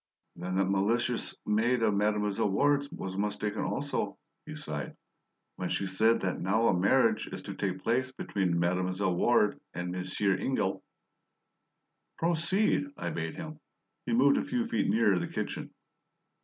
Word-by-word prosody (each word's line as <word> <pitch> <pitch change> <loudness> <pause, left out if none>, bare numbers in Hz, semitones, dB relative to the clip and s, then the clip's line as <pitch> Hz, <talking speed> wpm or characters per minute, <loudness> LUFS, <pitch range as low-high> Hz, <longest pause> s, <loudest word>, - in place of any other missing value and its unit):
"Then 90 +1 -4
that 95 0 +3
malicious 110 +5 +1
maid 115 +3 +2
of 110 -2 +3
Mademoiselle 105 0 +1
Ward's 140 +7 +2
was 95 0 -5
mistaken 105 +1 -2
also," 145 +1 -2 0.3
he 155 - -6
sighed, 75 - -5 0.6
"when 90 -1 -3
she 100 - -1
said 110 +5 +3
that 95 - -2
now 105 +5 +2
a - - +3
marriage 110 +5 +3
is - - -7
to - - -6
take 95 -2 -3
place 130 +3 +1
between 95 -8 -1
Mademoiselle 90 +2 0
Ward 105 +2 +3 0.2
and 90 0 -3
Monsieur 90 +2 0
Ingle 95 -2 -1 0.7
" - - -52
"Proceed," 175 - +2
I - - -3
bade 80 -1 -4
him. 155 -2 -7 0.5
He 120 - 0
moved 140 +4 +5
a - - -1
few 245 -1 -1
feet 230 - 0
nearer 105 -3 +3
the - - -3
kitchen. - - -4
105 Hz, 155 wpm, -30 LUFS, 95-130 Hz, 0.7 s, moved